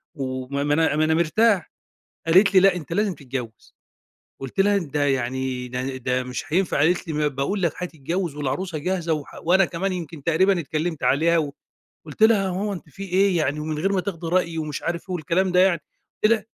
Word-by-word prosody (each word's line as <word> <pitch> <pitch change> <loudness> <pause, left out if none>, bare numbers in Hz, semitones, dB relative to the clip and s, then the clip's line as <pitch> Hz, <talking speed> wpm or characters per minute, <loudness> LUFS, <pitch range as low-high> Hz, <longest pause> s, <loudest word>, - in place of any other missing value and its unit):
و 130 -2 -4
ما 140 +1 -2
أنا 160 -1 +2
ما 155 +1 +2
أنا 160 - +2
مرتاح. 180 +4 +2 0.6
قالت 190 +5 +5
لي: 185 - +8
"لأ 195 -1 +5
أنت 165 -2 -7
لازم 200 0 +1
تتجوّز." 125 -5 -7 0.7
قُلت 135 +7 -3
لها: 200 +1 +4
"ده 150 -5 -1
يعني 130 -1 -1
ده 125 +1 -3
ده 130 0 -1
مش 125 0 -5
هينفع." 185 -3 +1
قالت 170 +5 +2
لي: - - -2
"ما 150 0 +1
باقول 145 +9 -2
لك 170 -4 +2
هتتجوّز 170 -1 -3
والعروسة 155 +5 -3
جاهزة 170 +1 -1
و 150 -2 -4 0.2
وأنا 185 +3 +4
كمان 185 +3 -2
يمكن 165 -4 -6
تقريبًا 175 +4 +3
اتكلّمت 160 +1 -3
عليها 165 +4 +3
و" 145 -3 -1 0.5
قُلت 155 +7 -6
لها: 220 -3 +5
"يا 190 - -1
ماما 200 +3 -2
أنتِ 175 -4 -8
في 170 +7 -10
إيه؟ 190 0 +2
يعني 150 -1 0
ومن 155 0 -3
غير 195 +6 0
ما 190 - +2
تاخدي 175 -4 -5
رأيي،" 170 -1 0
ومش 155 -2 -4
عارف 170 +2 -3
إيه 185 - -3
والكلام 175 +3 0
ده 180 - +5
يعني." 185 -3 +3 0.4
قُلت 215 - +6
لها 220 -3 0
165 Hz, 205 wpm, -23 LUFS, 145-185 Hz, 0.7 s, لي